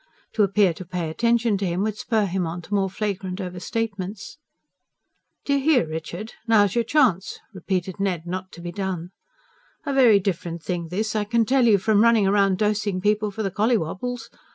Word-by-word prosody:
To 220 - +1
appear 200 -2 +3
to 185 - -9
pay 170 -2 -4
attention 230 +1 +1
to 195 - -1
him 175 +3 -1
would 215 -1 -1
spur 215 -1 0
him 185 -2 -1
on 170 +2 -6
to 205 - -8
more 195 -1 +1
flagrant 195 -2 -4
over 180 -2 -5
statements. 200 0 -4 1.1
"D'ye 280 -1 +2
hear, 275 - +3
Richard? 170 +7 -6
Now's 205 -4 +4
your 235 - +1
chance," 230 - +1 0.2
repeated 190 0 -3
Ned, 180 -4 -1
not 185 +1 -5
to 170 - -10
be 175 0 -5
done. 185 -2 -4 0.7
"A 280 - -1
very 240 -6 +6
different 170 -3 -3
thing 175 -2 -3
this, 215 +6 -2
I 210 - +1
can 230 +2 +2
tell 255 +1 +3
you, 210 -3 +6
from 205 +2 +2
running 230 -3 +4
round 195 -1 +3
dosing 210 -2 0
people 210 +2 +1
for 215 +2 -5
the 195 - -2
collywobbles. 225 +3 -1
200 Hz, 185 wpm, -23 LUFS, 180-220 Hz, 1.1 s, very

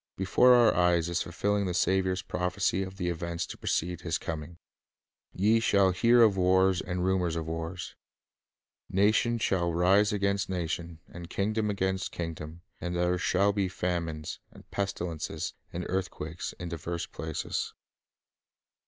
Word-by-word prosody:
Before 125 +6 +5
our 120 -2 +6
eyes 85 -1 +3
is 85 0 0
fulfilling 100 +3 0
the 90 - -2
Saviour's 95 0 +1
prophecy 90 +1 0
of 95 0 -6
the 90 -3 -1
events 85 0 -3
to - - -8
precede 90 +1 -2
His 85 -2 -1
coming: 80 +1 -6 0.7
"Ye 110 +5 +3
shall 100 -4 +4
hear 115 +6 +5
of 105 -3 +5
wars 95 0 +3
and 90 0 -2
rumors 90 -3 +1
of 80 -1 -3
wars.... 80 +2 -5 1.0
Nation 110 +4 +3
shall 90 -6 +1
rise 95 +5 +4
against 100 -2 0
nation, 85 -2 -3
and 85 -1 -10
kingdom 105 +2 0
against 95 -1 -1
kingdom; 80 -1 -6 0.2
and 90 0 -3
there 90 +1 +1
shall 100 +4 +2
be 100 -2 0
famines, 85 -4 -3
and - - -16
pestilences, 90 -5 -3 0.2
and 90 +1 -4
earth 95 0 -1
quakes, 80 +3 -6
in 90 -1 -7
divers 85 +1 -4
places." 80 0 -4
90 Hz, 145 wpm, -29 LUFS, 85-100 Hz, 1.0 s, our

